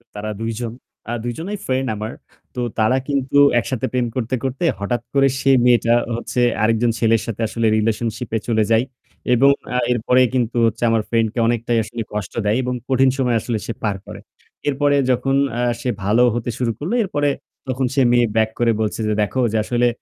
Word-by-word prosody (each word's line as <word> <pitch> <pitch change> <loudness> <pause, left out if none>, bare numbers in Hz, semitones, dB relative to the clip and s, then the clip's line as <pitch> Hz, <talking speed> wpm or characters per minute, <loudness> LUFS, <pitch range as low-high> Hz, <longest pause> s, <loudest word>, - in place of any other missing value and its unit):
তারা 105 +1 -4
২ 115 0 -2
জন 120 -2 -3 0.4
আ - - -1
২ 120 - -2
জনেই 200 +6 -4
friend 130 0 0
আমার। 110 +2 -5 0.4
তো - - -4 0.2
তারা 110 +4 +3
কিন্তু 140 -1 0 0.2
একসাথে 120 +3 -3
প্রেম 125 -1 +1
করতে, 130 0 -1
করতে 130 +4 -3 0.2
হঠাৎ 110 +5 -2
করে 135 -1 +4
সেই 135 -1 +4
মেয়েটা 120 -1 +4 0.2
হচ্ছে 120 +1 -4 0.2
আরেকজন 115 +1 +2
ছেলের 115 -1 +3
সাথে 115 -1 -5
আসলে 115 +1 -2
relationship 115 +2 -1
এ - - -2
চলে 110 -2 +2
যায় 115 +1 +4 0.5
এবং 135 +3 +5 0.3
আ - - +2
এরপরে 125 +2 +3
কিন্তু 120 -2 0
হচ্ছে 115 +1 -1
আমার 115 -1 +2
friend 115 -1 +2
কে 125 - -3
অনেকটাই 120 0 0
আসলে 115 +2 -6
কষ্ট 105 -4 -4
দেয় 105 +3 +2
এবং 125 0 -2 0.2
কঠিন 135 0 +4
সময় 125 -3 +1
আসলে 115 0 -2
সে 115 - -3
পার 105 -2 0
করে। - - -9 0.5
এরপরে 145 +1 +2 0.2
যখন 130 +2 +1 0.2
আ - - +1 0.2
সে 125 - -2
ভালো 105 +5 +3
হতে 120 0 -3
শুরু 125 -3 0
করলো, 165 +9 -3
এরপরে 145 -7 0 0.4
তখন 130 0 -1
সে 135 - +2
মেয়ে 120 0 +4
back 110 0 +3
করে 120 -1 +3
বলছে 110 - -2
যে 110 - +1
"দেখো 115 +5 0
যে 110 - 0
আসলে 120 +1 +1
120 Hz, 200 wpm, -20 LUFS, 115-130 Hz, 0.5 s, এবং